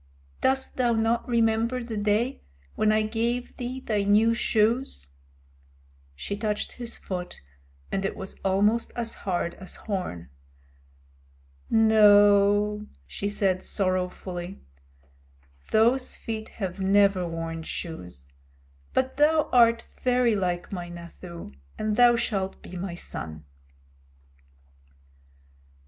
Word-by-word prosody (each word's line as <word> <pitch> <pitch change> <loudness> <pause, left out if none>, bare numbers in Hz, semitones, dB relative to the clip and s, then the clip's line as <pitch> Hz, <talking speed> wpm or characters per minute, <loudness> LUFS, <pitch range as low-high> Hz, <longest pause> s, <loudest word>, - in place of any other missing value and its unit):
"Dost 265 0 0
thou 245 -2 +3
not 225 +1 +1
remember 230 +1 +1
the 230 -1 -5
day 210 +5 0 0.3
when 215 0 +2
I 215 0 +3
gave 235 +3 -2
thee 250 +1 -4
thy 215 -5 0
new 210 +3 +4
shoes?" 225 - +1 1.0
She 200 - -4
touched 210 0 -2
his 240 -1 -7
foot, 180 -2 -6 0.5
and 195 - -1
it 195 - -2
was 190 - -7
almost 205 +4 +2
as 235 -1 -3
hard 175 -3 -2
as 185 - -7
horn. 135 - -5 1.4
"No," 210 -1 +5 0.2
she 200 - -4
said 195 -2 +1
sorrowfully, 185 -1 -2 1.1
"those 240 +4 +3
feet 220 -2 -5
have 190 -2 -5
never 195 -1 +3
worn 165 0 -4
shoes, 90 - -7 0.7
but 260 0 0
thou 305 +1 +3
art 235 -1 +5 0.2
very 250 -3 +3
like 180 -3 -2
my 175 -3 -5
Nathoo, 170 - -10 0.2
and 215 -1 -1
thou 240 +1 +6
shalt 195 -5 -2
be - - -9
my 180 -1 -4
son." 80 - -6
210 Hz, 110 wpm, -26 LUFS, 185-230 Hz, 1.4 s, thou